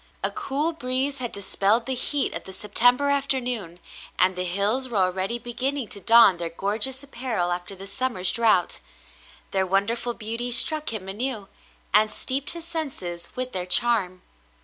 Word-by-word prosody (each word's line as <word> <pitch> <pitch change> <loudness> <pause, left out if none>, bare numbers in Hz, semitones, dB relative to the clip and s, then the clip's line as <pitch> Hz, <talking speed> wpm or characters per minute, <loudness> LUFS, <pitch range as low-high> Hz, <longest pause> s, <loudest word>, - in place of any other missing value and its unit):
A - - +1
cool 330 -6 -1
breeze 265 0 -1
had 245 -2 -4
dispelled 200 +3 +1
the 265 - 0
heat 275 +3 0
of - - -6
the 190 - -9
September 245 +8 +2
afternoon, 250 -10 -1 0.4
and 185 0 +3
the 180 0 -2
hills 205 +8 +2
were 230 - -3
already 190 +4 0
beginning 250 +1 -2
to 200 - -3
don 225 -3 +6
their 170 -1 -3
gorgeous 215 +10 -2
apparel 235 -10 -3
after 175 +2 -4
the 195 +1 -10
summer's 210 -4 0
drouth; 220 -7 +1 0.7
their 190 -1 0
wonderful 230 +5 0
beauty 230 +2 -2
struck 305 +5 +3
him 205 -4 -4
anew 210 0 -2 0.4
and 215 +1 +5
steeped 270 +5 -2
his 335 -1 -6
senses 225 - -5
with 255 0 -3
their 180 -3 -3
charm. 185 -3 +2
230 Hz, 160 wpm, -24 LUFS, 190-260 Hz, 0.7 s, don